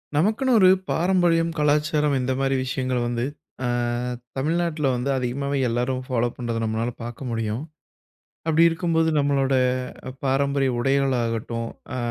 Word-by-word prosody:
நமக்குன்னு 220 Hz, -, +2 dB
ஒரு 185 Hz, -2 st, +7 dB, 0.2 s
பாரம்பரியம், 170 Hz, -1 st, +2 dB
கலாச்சாரம் 150 Hz, 0 st, +2 dB
இந்த 125 Hz, +1 st, -1 dB
மாதிரி 135 Hz, 0 st, +1 dB
விஷயங்கள் 130 Hz, -1 st, -1 dB
வந்து 120 Hz, 0 st, -1 dB, 0.4 s
அ -, -, +1 dB, 0.7 s
தமிழ்நாட்டில 160 Hz, +1 st, 0 dB
வந்து 125 Hz, +3 st, -2 dB
அதிகமாவே 140 Hz, +3 st, -2 dB
எல்லாரும் 125 Hz, +2 st, -1 dB
ஃபாலோ 120 Hz, -2 st, +1 dB
பண்ணுறத 120 Hz, -2 st, -3 dB
நம்மளால 110 Hz, +2 st, -1 dB
பார்க்க 120 Hz, +3 st, -6 dB
முடியும். 115 Hz, 0 st, -2 dB, 0.9 s
அப்படி 160 Hz, +1 st, +4 dB
இருக்கும்போது, 165 Hz, -1 st, +1 dB
நம்மளோட 140 Hz, -2 st, +2 dB, 0.6 s
அ -, -, -6 dB
பாரம்பரிய 135 Hz, 0 st, +1 dB
உடைகள் 135 Hz, +1 st, +2 dB
ஆகட்டும், 115 Hz, 0 st, -2 dB, 0.3 s
அ -, -, -2 dB
135 Hz, 130 wpm, -24 LUFS, 120-155 Hz, 0.9 s, ஒரு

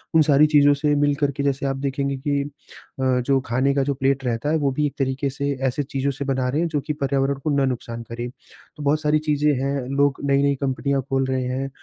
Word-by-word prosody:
उन 160 Hz, -, +7 dB
सारी 150 Hz, 0 st, +5 dB
चीज़ों 145 Hz, -1 st, +5 dB
से 145 Hz, +1 st, +1 dB
मिलकर 145 Hz, 0 st, +1 dB
के 140 Hz, -, -1 dB
जैसे 140 Hz, 0 st, 0 dB
आप 135 Hz, 0 st, -1 dB
देखेंगे 140 Hz, 0 st, -2 dB
कि 140 Hz, +1 st, -1 dB
अ, 140 Hz, -1 st, -11 dB, 0.2 s
जो 135 Hz, 0 st, +3 dB
खाने 130 Hz, +4 st, +1 dB
का 140 Hz, -, +2 dB
जो 140 Hz, +1 st, 0 dB
प्लेट 135 Hz, 0 st, 0 dB
रहता 120 Hz, +3 st, -1 dB
है, 160 Hz, -, +3 dB
वो 140 Hz, -3 st, +1 dB
भी 150 Hz, +3 st, 0 dB
एक 140 Hz, -, -7 dB
तरीके 135 Hz, +1 st, 0 dB
से 140 Hz, +1 st, -3 dB, 0.2 s
ऐसे 130 Hz, +3 st, -1 dB
चीज़ों 135 Hz, +1 st, -2 dB
से 140 Hz, +1 st, -5 dB
बना 130 Hz, -2 st, 0 dB
रहे 145 Hz, +5 st, 0 dB
हैं 170 Hz, -, +1 dB
जो 150 Hz, -3 st, -1 dB
कि 150 Hz, -, 0 dB
पर्यावरण 140 Hz, -1 st, 0 dB
को -, -, 0 dB
ना 140 Hz, -1 st, +3 dB
नुकसान 115 Hz, -2 st, -4 dB
करें। 120 Hz, +1 st, -5 dB, 0.5 s
तो 150 Hz, -, -7 dB
बहुत 150 Hz, +2 st, +2 dB
सारी 150 Hz, 0 st, +2 dB
चीज़ें 150 Hz, -1 st, +1 dB
हैं। 140 Hz, -, 0 dB, 0.3 s
लोग 140 Hz, -1 st, +3 dB
नई-नई 140 Hz, 0 st, +3 dB
कंपनियाँ 140 Hz, 0 st, 0 dB
खोल 135 Hz, 0 st, +1 dB
रहे 130 Hz, -1 st, -1 dB
हैं 130 Hz, +2 st, -2 dB
140 Hz, 240 wpm, -22 LUFS, 135-145 Hz, 0.5 s, उन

